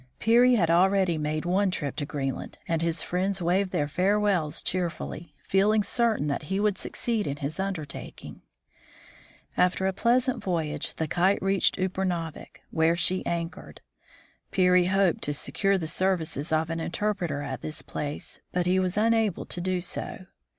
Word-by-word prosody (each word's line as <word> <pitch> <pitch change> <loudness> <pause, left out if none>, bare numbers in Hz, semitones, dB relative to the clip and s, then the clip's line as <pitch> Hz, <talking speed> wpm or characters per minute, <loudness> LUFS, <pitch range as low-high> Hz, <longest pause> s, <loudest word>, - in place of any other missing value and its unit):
Peary 245 +3 +5
had 170 -7 +2
already 185 0 +3
made 155 +1 -2
one 190 +3 +2
trip 145 -7 -3
to 145 - -2
Green 135 -3 -2
land, - - -9
and 165 -1 0
his 165 -1 0
friends 190 +2 -1
waved 185 +3 +1
their 145 -4 0
farewells 190 -1 +1
cheerfully, 170 -3 -3
feel 195 +2 +3
ing 215 -1 +3
certain 230 - +1
that 150 +1 -2
he 190 - 0
would 210 -1 +2
succeed 225 -4 -2
in 140 0 -3
his 145 +5 -4
undertaking. 185 -7 -5 1.1
After 180 +1 +2
a 190 - +1
pleasant 245 +5 +1
voyage, 155 -5 -2
the 160 - -2
Kite 180 +6 +2
reached 195 -1 +2
Upernavik, 180 -4 -3
where 160 +1 +3
she 185 +2 +2
anchored. 170 0 -4 0.7
Peary 180 -1 +4
hoped 190 -1 +2
to 145 - -1
secure 195 +6 +1
the 170 - -3
services 165 -3 0
of 160 +1 +1
an 165 - -2
interpreter 170 -4 -2
at 145 - -5
this 155 0 -4
place, 145 0 -5
but 180 -1 0
he 185 +1 +3
was 185 +1 -1
unable 220 -3 +2
to 175 - -4
do 185 0 0
so. 185 +1 -5
180 Hz, 165 wpm, -27 LUFS, 160-195 Hz, 1.1 s, Peary